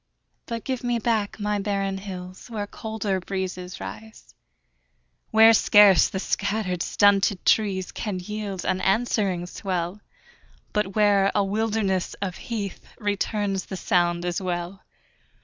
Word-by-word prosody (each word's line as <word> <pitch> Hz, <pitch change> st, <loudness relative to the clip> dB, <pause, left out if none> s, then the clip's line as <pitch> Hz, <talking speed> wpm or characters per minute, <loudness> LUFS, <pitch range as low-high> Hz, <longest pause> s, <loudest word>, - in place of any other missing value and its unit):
But 230 Hz, -1 st, -4 dB
give 260 Hz, -2 st, -3 dB
me 240 Hz, -1 st, +1 dB
back 220 Hz, -2 st, -1 dB
my 210 Hz, 0 st, 0 dB
barren 195 Hz, -1 st, -1 dB
hills 185 Hz, +1 st, -8 dB
Where 215 Hz, -3 st, -3 dB
colder 210 Hz, -2 st, -3 dB
breezes 185 Hz, -1 st, -5 dB
rise; 105 Hz, +3 st, -10 dB, 1.0 s
Where 225 Hz, +1 st, +7 dB
scarce 205 Hz, -3 st, +6 dB
the -, -, -4 dB
scattered, 200 Hz, -2 st, -1 dB
stunted 200 Hz, -1 st, +3 dB
trees 195 Hz, -4 st, +2 dB
Can 205 Hz, -4 st, -4 dB
yield 200 Hz, 0 st, -5 dB
an 185 Hz, -, 0 dB
answering 195 Hz, -4 st, +1 dB
swell, 180 Hz, +1 st, -3 dB, 0.7 s
But 210 Hz, -2 st, -1 dB
where 205 Hz, -2 st, +4 dB
a 205 Hz, -, +3 dB
wilderness 205 Hz, -2 st, -1 dB
of 190 Hz, -3 st, -4 dB
heath 205 Hz, -5 st, -5 dB
Returns 205 Hz, -2 st, -1 dB
the 190 Hz, -, -6 dB
sound 175 Hz, -1 st, +1 dB
as 175 Hz, +1 st, -1 dB
well. 180 Hz, +1 st, -4 dB
195 Hz, 130 wpm, -25 LUFS, 185-210 Hz, 1.0 s, Where